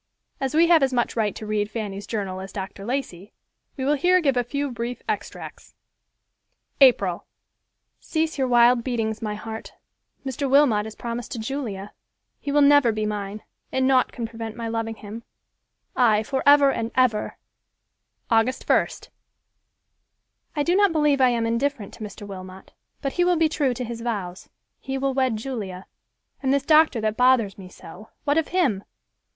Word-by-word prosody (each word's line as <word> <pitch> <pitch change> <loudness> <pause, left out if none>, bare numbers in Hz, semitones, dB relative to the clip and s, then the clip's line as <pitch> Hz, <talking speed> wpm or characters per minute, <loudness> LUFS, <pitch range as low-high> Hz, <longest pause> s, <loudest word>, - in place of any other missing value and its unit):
As 270 +2 -2
we 330 +2 +6
have 335 -2 +5
as 270 -1 +2
much 245 -2 0
right 215 -3 0
to 215 - -7
read 210 -1 -1
Fanny's 205 -3 -5
journal 195 -4 -3
as 190 0 -8
Dr. 195 0 -7
Lacey, 220 -7 -4 0.4
we 260 - -2
will 290 - +3
here 360 +5 +3
give 280 -6 +1
a 245 - +2
few 280 +3 -3
brief 240 +1 -5
extracts: - - -6 1.0
April—"Cease 270 - 0
your 265 -2 0
wild 240 0 +5
beatings, 225 -4 -2
my 210 -2 -3
heart. 220 +1 -8 0.5
Mr. 270 +1 -2
Wilmot 255 -7 +4
is 220 - -9
promised 235 0 -5
to - - -5
Julia. 220 -5 -5 0.5
He 285 - -4
will 290 0 +4
never 285 -4 +6
be 215 0 -2
mine, 210 0 -4 0.3
but 260 - 0
nought 260 -1 +3
can 235 - -5
prevent 225 -1 -7
my 230 -1 -5
loving 225 0 -3
him; 215 +2 -9 0.7
ay, 220 -4 +3
forever 280 +3 +4
and 225 -3 -3
ever." 250 -5 +1 0.9
August 230 +3 +2
1st—"I 295 - -5
do 345 +4 +2
not 405 -1 +4
believe 295 -3 +2
I 255 - +6
am 235 -2 0
indifferent 235 -1 -1
to - - -9
Mr. 205 0 -8
Wilmot, 190 -1 -10 0.3
but 275 - -2
he 355 - +2
will 355 -1 +3
be 320 0 +4
true 285 -5 0
to 250 - -4
his 235 -1 -6
vows—he 225 +4 -6
will 270 0 0
wed 260 -4 +1
Julia; 210 -7 -6 0.6
and 265 -1 +1
this 280 -1 +2
doctor 310 -5 +5
that 215 0 -1
bothers 250 -6 +3
me 185 -1 -10
so, 185 +5 -13
what 290 +2 +2
of 325 - -2
him? 270 - +1
240 Hz, 165 wpm, -24 LUFS, 215-275 Hz, 1.0 s, we